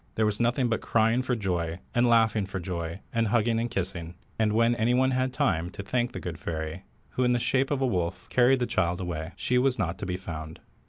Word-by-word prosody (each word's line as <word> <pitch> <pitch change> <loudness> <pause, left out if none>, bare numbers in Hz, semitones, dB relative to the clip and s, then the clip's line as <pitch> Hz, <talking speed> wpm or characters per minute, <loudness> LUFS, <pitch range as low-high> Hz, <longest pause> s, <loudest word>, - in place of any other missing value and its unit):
There 110 - +2
was 105 -1 0
nothing 120 +2 +2
but 115 -1 -1
crying 115 +2 +2
for 130 -1 -1
joy, 85 -6 -2 0.2
and 120 +1 +3
laughing 110 -3 +3
for 95 - -4
joy, 85 0 -4
and 115 -1 +2
hugging 115 +1 +2
and 120 +1 -1
kissing, 85 -4 -4 0.2
and 110 -1 +3
when 115 +2 +3
any 120 +1 +2
one 130 +1 +3
had 130 0 0
time 90 -8 0
to 100 - -6
thank 120 +4 0
the - - -6
good 85 -2 -6
fairy, 80 +1 -4 0.3
who 130 - 0
in 125 0 +3
the - - +3
shape 135 +3 +1
of 140 -2 -1
a - - +3
wolf, 90 -7 -2
carried 125 +1 +4
the - - +3
child 90 -6 0
away, 85 -2 -4
she 125 0 +1
was 130 0 +2
not 90 -4 -2
to 100 - -4
be 90 0 -2
found. 80 -3 -7
110 Hz, 235 wpm, -27 LUFS, 90-120 Hz, 0.3 s, carried